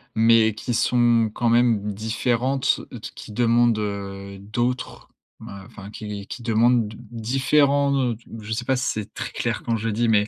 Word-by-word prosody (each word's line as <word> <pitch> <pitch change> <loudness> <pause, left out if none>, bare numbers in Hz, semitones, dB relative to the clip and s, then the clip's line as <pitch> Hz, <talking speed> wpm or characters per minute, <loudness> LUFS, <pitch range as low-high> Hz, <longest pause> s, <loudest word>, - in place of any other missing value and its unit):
mais 110 -1 +5
qui 120 +3 -4
sont 120 -1 +3
quand 120 - -1
même 115 -4 +2
différentes, 120 +5 0
heu, - - -8
t - - -7
qui - - -10
demandent, 120 0 +3
heu, 100 -1 -5
d'autres, 120 +5 -3 0.3
ben, 100 0 -10
enfin, 105 -4 -11
qui 105 -2 -7
qui 120 - -8
demandent 115 0 +3
d 110 - -11
différents, 140 +4 +2 0.2
heu, 115 - -3
t 115 - -25 0.2
je 105 +1 -8
sais 115 +2 -2
pas 130 - +2
si 130 +1 -1
c'est 110 -2 -6
très - - -5
clair - - -2
quand 115 -1 0
je 110 +1 -3
le 110 - -1
dis, 115 +1 +1
mais 105 -1 +3
115 Hz, 195 wpm, -23 LUFS, 105-120 Hz, 0.3 s, mais